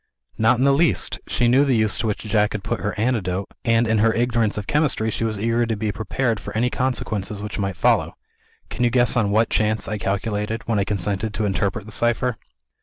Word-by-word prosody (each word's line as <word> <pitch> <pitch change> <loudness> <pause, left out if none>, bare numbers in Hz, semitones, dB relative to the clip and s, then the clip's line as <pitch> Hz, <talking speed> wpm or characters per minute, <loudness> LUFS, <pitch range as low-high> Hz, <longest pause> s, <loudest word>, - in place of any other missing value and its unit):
"Not 110 +3 +4
in 130 - +1
the 140 - +5
least. 160 +3 +1
She 120 - +1
knew 130 +4 +5
the 135 -3 +2
use 110 -2 +1
to 115 - -1
which 105 - -2
Jack 105 -1 +1
had 105 -2 -4
put - - -2
her 105 0 -3
antidote, 100 -5 -1
and 115 0 +3
(in 110 -1 +2
her 110 +2 +4
ignorance 115 -3 +1
of 105 - -3
chemistry) 140 -7 +1
she 115 - -3
was 110 -2 -1
eager 115 +3 +1
to 115 - -1
be 105 0 -2
prepared 110 +2 -1
for 110 - -6
any 125 +2 +1
consequences 110 -6 -2
which 105 +1 -5
might 95 -3 -2
follow. - - +2 0.6
Can - - -2
you 120 - +4
guess 120 -1 +2
on 110 -4 +2
what 110 +2 +2
chance 110 0 +1
I 105 -1 -3
calculated, 105 +2 -2
when 110 -3 +1
I 100 - +1
consented 105 +2 -2
to 110 - -1
interpret 100 +2 -1
the 110 - -10
cipher?" 120 +1 0
110 Hz, 225 wpm, -22 LUFS, 105-120 Hz, 0.6 s, the